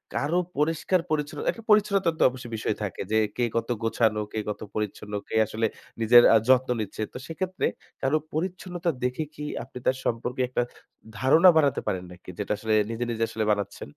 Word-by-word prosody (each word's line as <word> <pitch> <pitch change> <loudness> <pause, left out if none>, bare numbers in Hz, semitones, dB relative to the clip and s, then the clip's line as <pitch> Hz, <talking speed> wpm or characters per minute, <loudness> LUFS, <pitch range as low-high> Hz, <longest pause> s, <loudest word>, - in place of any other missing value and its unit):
কারো 155 +5 +1 0.2
পরিষ্কার 165 +4 +1
পরিচ্ছন্ন 150 -1 -2
একটা 230 - -12
পরিচ্ছন্নতার 200 -5 +3
তো - - +4
অবশ্যই 125 -2 -9
বিষয় 110 - -1
থাকে। 95 - -4
যে 110 - +3 0.2
কে 120 - +1
কত 115 +1 -1
গোছানো, 110 -1 +2
কে 110 - -1
কত 105 - -5
পরিচ্ছন্ন, 105 0 -4
কে - - -5
আসলে 110 +1 -2 0.4
নিজের 120 +2 +8
আ - - +8
যত্ন 130 0 +4
নিচ্ছে। 105 +1 -5
তো - - -6
সেক্ষেত্রে 185 +3 -2 0.4
কারো 135 +3 +2 0.2
পরিচ্ছন্নতা 175 +1 -2
দেখে 125 +5 0
কি 150 - -8 0.2
আপনি - - -11
তার 130 0 +2
সম্পর্কে 120 +2 -1
একটা 125 - 0 0.6
ধারণা 160 - +6
বানাতে 145 -4 +3
পারেন 90 -1 -1
নাকি? 90 0 -13
যেটা 105 - -3
আসলে 110 -1 -1 0.2
নিজে, 115 +1 -2
নিজে 115 0 -1
আসলে 110 - -2
বানাচ্ছেন। 100 -7 -3
125 Hz, 180 wpm, -26 LUFS, 110-160 Hz, 0.6 s, নিজের